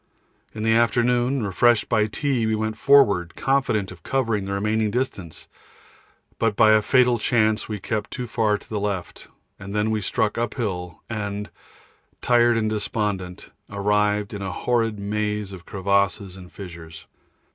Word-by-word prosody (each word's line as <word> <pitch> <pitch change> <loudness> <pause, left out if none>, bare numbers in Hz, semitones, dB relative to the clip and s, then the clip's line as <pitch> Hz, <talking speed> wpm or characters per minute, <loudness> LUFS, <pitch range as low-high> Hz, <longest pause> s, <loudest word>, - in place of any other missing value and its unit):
In 110 - -4
the 115 0 +3
afternoon, 120 +1 +2
refreshed 110 +3 +3
by 110 -3 +2
tea, 125 0 -1
we 110 - +1
went 110 0 -2
forward, 110 -10 +4
confident 135 -8 0
of 90 -3 -12
covering 115 -4 -1
the 100 - -3
remaining 105 +2 0
distance, 100 - -4 0.9
but 115 -2 +1
by 110 +1 +5
a 110 0 +5
fatal 125 0 +3
chance 110 -1 +1
we 105 -1 -4
kept 110 +2 -3
too 125 - -5
far 110 -3 +1
to - - -17
the 110 - -3
left, 100 -4 -4 0.3
and 100 +2 -7
then 105 +1 +1
we 110 -1 -1
struck 110 +1 -1
uphill 100 -8 -4
and, 105 -3 -4 0.7
tired 120 -1 +3
and 110 -1 0
despondent, 105 -4 -3 0.2
arrived 105 0 0
in 100 - -5
a 95 -1 -3
horrid 115 +1 0
maze 105 0 -2
of 90 -2 -11
crevasses 100 -1 0
and 90 -2 -12
fissures. 80 -4 -10
105 Hz, 155 wpm, -23 LUFS, 100-115 Hz, 0.9 s, by